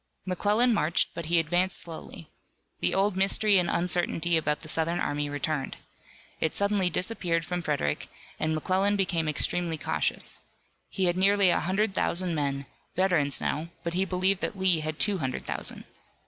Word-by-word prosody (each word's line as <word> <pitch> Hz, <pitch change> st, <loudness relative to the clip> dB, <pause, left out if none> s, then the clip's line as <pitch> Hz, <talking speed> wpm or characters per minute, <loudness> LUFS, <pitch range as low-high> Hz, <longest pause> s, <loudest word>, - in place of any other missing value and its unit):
McClellan 210 Hz, +6 st, +2 dB
marched, 170 Hz, -5 st, +2 dB
but 165 Hz, -1 st, -6 dB
he 170 Hz, +1 st, +3 dB
advanced 175 Hz, +3 st, +1 dB
slowly. 165 Hz, -1 st, -9 dB, 0.5 s
The -, -, +1 dB
old 195 Hz, 0 st, +2 dB
mystery 195 Hz, +1 st, +4 dB
and 175 Hz, -, 0 dB
uncertainty 175 Hz, -1 st, 0 dB
about 150 Hz, -2 st, 0 dB
the -, -, -9 dB
Southern 165 Hz, +2 st, +1 dB
army 145 Hz, 0 st, -1 dB
returned. 145 Hz, 0 st, -3 dB, 0.6 s
It 160 Hz, -, -1 dB
suddenly 200 Hz, -2 st, +1 dB
disappeared 175 Hz, -2 st, 0 dB
from 175 Hz, +1 st, -3 dB
Frederick, 145 Hz, -, -1 dB, 0.3 s
and 155 Hz, 0 st, 0 dB
McClellan 190 Hz, +6 st, +1 dB
became 175 Hz, -5 st, 0 dB
extremely 165 Hz, +2 st, +1 dB
cautious. -, -, 0 dB, 0.5 s
He 190 Hz, -1 st, -1 dB
had 175 Hz, 0 st, +1 dB
nearly 195 Hz, 0 st, +4 dB
a -, -, +2 dB
hundred 195 Hz, +4 st, 0 dB
thousand 180 Hz, -1 st, 0 dB
men, 140 Hz, -2 st, -2 dB, 0.3 s
veterans 170 Hz, -7 st, +2 dB
now, 155 Hz, +3 st, -2 dB, 0.2 s
but 170 Hz, -, -3 dB
he 185 Hz, +2 st, +1 dB
believed 185 Hz, 0 st, +1 dB
that 200 Hz, -, -2 dB
Lee 185 Hz, -3 st, +3 dB
had 155 Hz, 0 st, -4 dB
two 200 Hz, 0 st, +1 dB
hundred 130 Hz, -3 st, -3 dB
thousand. -, -, -5 dB
175 Hz, 160 wpm, -27 LUFS, 155-190 Hz, 0.6 s, mystery